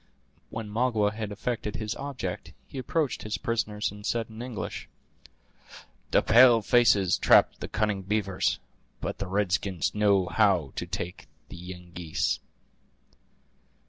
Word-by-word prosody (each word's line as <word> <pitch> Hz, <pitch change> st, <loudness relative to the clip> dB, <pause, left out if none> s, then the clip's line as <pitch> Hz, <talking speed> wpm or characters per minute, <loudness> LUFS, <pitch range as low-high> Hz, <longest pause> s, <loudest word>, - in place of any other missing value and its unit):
When 110 Hz, -1 st, -5 dB
Magua 110 Hz, -1 st, +1 dB
had 110 Hz, -1 st, -5 dB
effected 105 Hz, 0 st, -3 dB
his 110 Hz, -1 st, -3 dB
object 125 Hz, -9 st, -5 dB
he 135 Hz, -, -7 dB
approached 145 Hz, +3 st, -1 dB
his 105 Hz, 0 st, -3 dB
prisoners, 110 Hz, -5 st, -1 dB
and 105 Hz, 0 st, -11 dB
said 115 Hz, +1 st, -2 dB
in 110 Hz, +1 st, -8 dB
English: 120 Hz, -4 st, -6 dB, 1.2 s
"The -, -, +3 dB
pale 120 Hz, 0 st, +7 dB
faces 105 Hz, -6 st, +4 dB
trap -, -, +6 dB
the -, -, -5 dB
cunning 105 Hz, -2 st, -1 dB
beavers; 100 Hz, -1 st, 0 dB, 0.4 s
but -, -, -4 dB
the 100 Hz, -, -3 dB
red 100 Hz, 0 st, 0 dB
skins 95 Hz, -5 st, 0 dB
know 100 Hz, -3 st, +3 dB
how 90 Hz, -8 st, +2 dB
to 90 Hz, -, -3 dB
take 90 Hz, 0 st, -5 dB, 0.2 s
the -, -, -9 dB
Yengeese." 90 Hz, -2 st, -3 dB
105 Hz, 135 wpm, -27 LUFS, 95-115 Hz, 1.2 s, pale